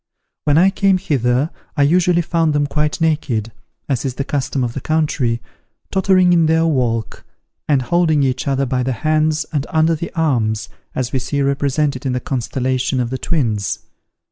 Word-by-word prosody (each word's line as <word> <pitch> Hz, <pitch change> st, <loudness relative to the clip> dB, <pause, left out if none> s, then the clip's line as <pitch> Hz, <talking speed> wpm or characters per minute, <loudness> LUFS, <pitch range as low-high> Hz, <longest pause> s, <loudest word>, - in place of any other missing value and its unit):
When 145 Hz, 0 st, +3 dB
I 190 Hz, +3 st, +5 dB
came 195 Hz, -1 st, +2 dB
hither, 135 Hz, -4 st, 0 dB, 0.3 s
I 145 Hz, -, +4 dB
usually 175 Hz, +3 st, +3 dB
found 165 Hz, -2 st, +1 dB
them 145 Hz, 0 st, +2 dB
quite 150 Hz, +2 st, -1 dB
naked, 135 Hz, -9 st, 0 dB, 0.4 s
as 135 Hz, -4 st, -1 dB
is 130 Hz, -3 st, -3 dB
the 140 Hz, -, -2 dB
custom 135 Hz, -1 st, -2 dB
of 120 Hz, -1 st, -2 dB
the 135 Hz, -, -5 dB
country, 145 Hz, -7 st, 0 dB, 0.5 s
tottering 185 Hz, -2 st, +4 dB
in 165 Hz, -2 st, +4 dB
their 160 Hz, +1 st, +3 dB
walk, 120 Hz, -8 st, -1 dB, 0.4 s
and 140 Hz, -4 st, +2 dB
holding 160 Hz, 0 st, +2 dB
each 130 Hz, 0 st, -1 dB
other 135 Hz, 0 st, +1 dB
by 125 Hz, 0 st, -1 dB
the 130 Hz, +1 st, -1 dB
hands 155 Hz, 0 st, +2 dB
and 145 Hz, -1 st, -1 dB
under 160 Hz, -1 st, +2 dB
the 165 Hz, +1 st, -4 dB
arms, 115 Hz, -9 st, 0 dB, 0.3 s
as 125 Hz, -1 st, -2 dB
we 130 Hz, -, +1 dB
see 140 Hz, +3 st, -1 dB
represented 140 Hz, 0 st, 0 dB
in 130 Hz, -, 0 dB
the 125 Hz, -, 0 dB
constellation 130 Hz, +1 st, -1 dB
of 120 Hz, -1 st, -1 dB
the 130 Hz, -, -3 dB
Twins. 110 Hz, -, -1 dB
140 Hz, 175 wpm, -18 LUFS, 125-160 Hz, 0.5 s, I